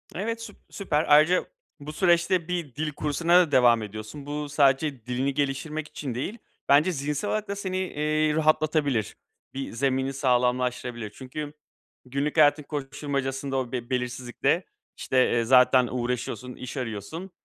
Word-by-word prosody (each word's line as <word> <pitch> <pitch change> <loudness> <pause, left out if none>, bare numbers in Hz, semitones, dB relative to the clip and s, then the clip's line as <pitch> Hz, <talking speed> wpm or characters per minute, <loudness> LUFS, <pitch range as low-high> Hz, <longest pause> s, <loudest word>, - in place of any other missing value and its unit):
Evet, 225 +6 -3
süp 230 - -9
süper, 160 -6 -1
ayrıca 155 +5 +5 0.3
bu 150 +2 -8
süreçte 175 0 +2
bir 170 -7 -4
dil 155 +1 -2
kursuna 160 +4 +2
da 170 -5 +2
devam 120 -3 +5
ediyorsun. 110 +7 -8
Bu 145 0 -4
sadece 140 -3 +2
dilini 130 +3 -1
geliştirmek 145 +2 -2
için 140 -5 -6
değil, 195 - -4 0.3
bence 150 +6 +5
zihinsel 150 +4 -2
olarak 215 -1 -1
da 200 - -3
seni, 190 -2 -3
eee, 155 -4 0
rahatlatabilir, 155 -6 +1 0.4
bir 135 0 -5
zemini 130 +2 0
sağlamlaştırabilir. 125 -3 0
Çünkü 140 +6 -7 0.5
günlük 140 +4 -2
hayatın 150 0 +5
koşuşturmacasında 140 -1 -3
o 125 -2 -2
be 120 -1 -4
belirsizlikte, 125 +5 -1 0.3
işte, 130 -1 +2
eee, 120 -1 +2
zaten 125 0 +5
uğraşıyorsun, 125 0 -3
iş 125 - -8
arıyorsun 130 - -5
140 Hz, 140 wpm, -26 LUFS, 125-155 Hz, 0.5 s, ayrıca